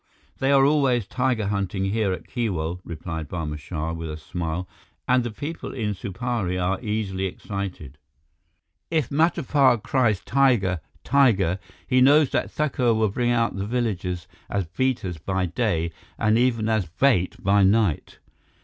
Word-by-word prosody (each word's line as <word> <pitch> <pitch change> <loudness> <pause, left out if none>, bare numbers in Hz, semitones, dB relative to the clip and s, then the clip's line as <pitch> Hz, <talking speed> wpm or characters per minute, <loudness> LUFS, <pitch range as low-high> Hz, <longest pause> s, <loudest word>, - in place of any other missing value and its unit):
"They 135 +1 +2
are 135 -1 +6
always 135 -6 +3
tiger 125 -1 0
hunting 100 -1 -1
here 100 0 0
at 90 - -5
Keewal," 90 -8 -2
replied 80 -2 -6
Barma 75 -3 -4
Shah 75 +4 -4
with 80 -1 -5
a 75 - -5
smile, 85 +2 -4 0.4
"and 125 0 +3
the 120 - -3
people 145 +11 -6
in 105 -5 -1
Supari 100 0 -3
are 90 +1 -1
easily 100 -3 -1
excited. 90 -7 -6 0.9
If 155 -7 0
Matapar 145 -4 +3
cries, 120 -7 +2
'Tiger! 120 -9 +2 0.2
Tiger!' 100 -10 +3 0.3
he 130 -1 +3
knows 145 +2 +6
that - - 0
Thakur 130 -6 +1
will 110 -1 +2
bring 120 +4 0
out 115 -3 +1
the 100 +1 -3
villagers 95 -7 -2 0.2
as 100 -2 -1
beaters 95 -2 -2
by 95 +3 -1
day 85 -3 -1 0.3
and 110 -1 +2
even 115 -2 +2
as 110 -5 +1
bait 95 - +2
by 100 +1 +3
night." 100 -5 +2
105 Hz, 150 wpm, -24 LUFS, 90-125 Hz, 0.9 s, are